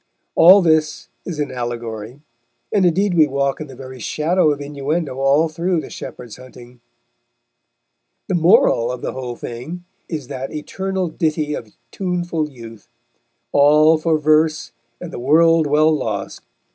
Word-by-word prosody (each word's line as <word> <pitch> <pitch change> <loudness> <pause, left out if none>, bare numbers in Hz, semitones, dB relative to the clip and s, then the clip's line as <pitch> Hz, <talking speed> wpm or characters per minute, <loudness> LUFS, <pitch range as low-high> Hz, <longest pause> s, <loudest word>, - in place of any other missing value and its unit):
All 185 +3 +7
this 155 -2 +1 0.2
is 170 -4 -5
an 145 -1 -2
allegory; 120 0 -6 0.5
and 195 -3 +4
indeed 190 +3 +1
we 160 -3 +4
walk 140 +1 -1
in 155 - -6
the 135 - -12
very 130 0 -10
shadow 155 - +1
of 145 -1 -1
innuendo 145 0 -3
all 140 +4 +3
through 170 +2 -1
The - - -8
Shepherd's 120 -3 -9
Hunting. 125 -1 -15 1.5
The - - -2
moral 165 -8 +3
of 125 -1 -6
the - - -2
whole 125 -2 -5
thing 125 +11 -7 0.3
is 150 -6 -5
that 130 +2 -6
eternal 190 +4 -3
ditty 155 -2 -1
of 110 -7 -7 0.2
tuneful 175 -4 -2
youth: 115 -5 -13 0.6
All 150 +2 +5
for 160 0 +1
Verse 155 -2 +1 0.3
and 175 -2 -8
the - - -5
World 160 +4 +4
well 155 +2 +3
lost. 110 -8 -4
150 Hz, 145 wpm, -19 LUFS, 130-165 Hz, 1.5 s, All